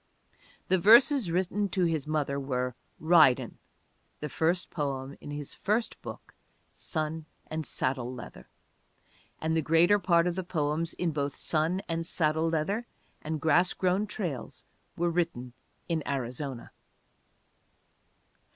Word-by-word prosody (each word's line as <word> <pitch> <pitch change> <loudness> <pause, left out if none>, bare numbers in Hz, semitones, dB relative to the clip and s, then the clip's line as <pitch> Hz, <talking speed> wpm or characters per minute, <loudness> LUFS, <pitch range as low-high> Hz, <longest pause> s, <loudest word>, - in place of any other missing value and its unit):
The 185 - +3
verses 235 - +6
written 190 +4 0
to 185 -2 0
his 160 -4 0
mother 145 -2 -1
were 125 -2 -2 0.3
Ridin', 150 - +4 0.6
the 150 - -4
first 170 +5 0
poem 140 -3 -3
in - - -9
his 145 -1 -4
first 220 +3 -1
book, - - -9 0.4
Sun 155 -1 -4 0.2
and 155 -3 -4
Saddle 130 0 -1
Leather, 120 - -10 0.9
and 160 +1 -1
the 160 - +2
greater 165 +7 +4
part 170 -3 +3
of 180 - +1
the 185 +1 -3
poems 160 -1 -1
in 175 -2 -1
both 145 -2 -2
Sun 165 +5 0
and 165 0 -2
Saddle 160 -1 +1
Leather 195 +9 -1 0.3
and 155 0 -3
Grass 160 +4 +3
Grown 190 +3 +1
Trails 180 - -5 0.3
were 175 0 +1
written 165 -8 -2 0.3
in 165 -2 0
Arizona. 130 -1 -4
160 Hz, 130 wpm, -29 LUFS, 140-175 Hz, 0.9 s, verses